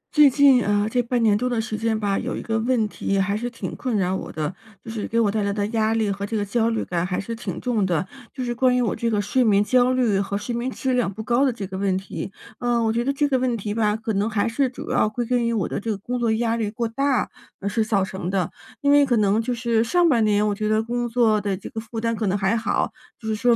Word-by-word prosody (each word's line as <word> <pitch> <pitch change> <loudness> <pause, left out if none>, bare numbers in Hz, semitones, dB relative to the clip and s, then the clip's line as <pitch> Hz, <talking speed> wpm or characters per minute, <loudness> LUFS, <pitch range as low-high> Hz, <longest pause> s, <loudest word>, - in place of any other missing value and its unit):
最 295 -1 +8
近， 270 -2 +5
呃， 205 +1 +1
这 245 - +2
半 240 0 0
年 215 -2 +4
多 250 +4 0
的 240 -2 0
时 220 -1 -3
间 220 0 0
吧， 200 -2 0
有 - - -3
一 - - -4
个 225 0 -1
问 230 -2 +1
题 195 -1 -2
还 200 +1 +1
是 240 +3 -3
挺 235 - -6
困 245 -4 -2
扰 185 -1 +1
我 - - -5
的， 155 +2 -3 0.3
就 225 - -6
是 220 -2 -4
给 230 - 0
我 215 -3 +3
带 215 +1 0
来 200 0 0
的 205 0 -1
压 220 -1 +1
力 220 -3 +1
和 200 0 -4
这 220 +2 -2
个 205 - -1
焦 225 +2 +1
虑 225 -1 -1
感 170 -2 -1
还 180 0 -2
是 230 +4 -4
挺 200 -6 -5
重 235 -5 0
的， 180 -1 0 0.2
就 260 - -5
是 240 -1 -2
关 250 +1 +2
于 - - +2
我 220 - 0
这 235 - -1
个 215 -2 +1
睡 205 +5 +1
眠 205 -3 +4
焦 250 +3 +3
虑 240 -6 +2
和 200 0 -2
睡 215 +4 -4
眠 240 +2 -2
质 260 0 -2
量 245 -5 +1
不 220 +3 -7
高 240 +4 +2
的 270 - +3
这 225 -4 -6
个 190 0 -6
问 195 -2 +1
题。 190 0 -6 0.3
呃， 240 -1 +1
我 220 0 +1
觉 235 +1 0
得 275 - +1
这 290 +1 +1
个 265 -2 +1
问 250 -2 0
题 205 0 -4
吧， 210 -1 +1
可 220 0 -3
能 205 +2 0
还 215 -2 0
是 260 +3 +1
主 245 - -7
要 210 - +3
归 240 +3 -3
根 245 0 +1
于 - - +1
我 215 -6 0
的 - - -3
这 225 - -5
个 210 - -1
工 245 +5 -4
作 235 -2 +1
压 230 0 0
力 220 -3 -1
过 230 +2 -2
大 275 +3 0 0.3
而 200 - -4
是 220 +2 +1
造 210 -3 +1
成 190 -2 -5
的， 190 -3 -1 0.3
因 285 - +3
为 290 0 +6
可 240 -3 +2
能 210 +1 +3
就 240 +2 -3
是 230 -1 +1
上 350 +9 +3
半 240 -8 +3
年， 210 0 +2
我 205 - +1
觉 215 +1 -2
得 215 +1 +2
工 240 +1 -2
作 225 -3 +3
的 200 -1 -1
这 185 - -9
个 220 - -4
负 225 0 -6
担 230 0 0
可 220 -1 -2
能 190 +1 +1
还 195 +3 +1
好， 230 0 0 0.3
就 220 - -8
是 220 - 0
说 235 +2 +3
225 Hz, 320 characters per minute, -23 LUFS, 205-240 Hz, 0.3 s, 最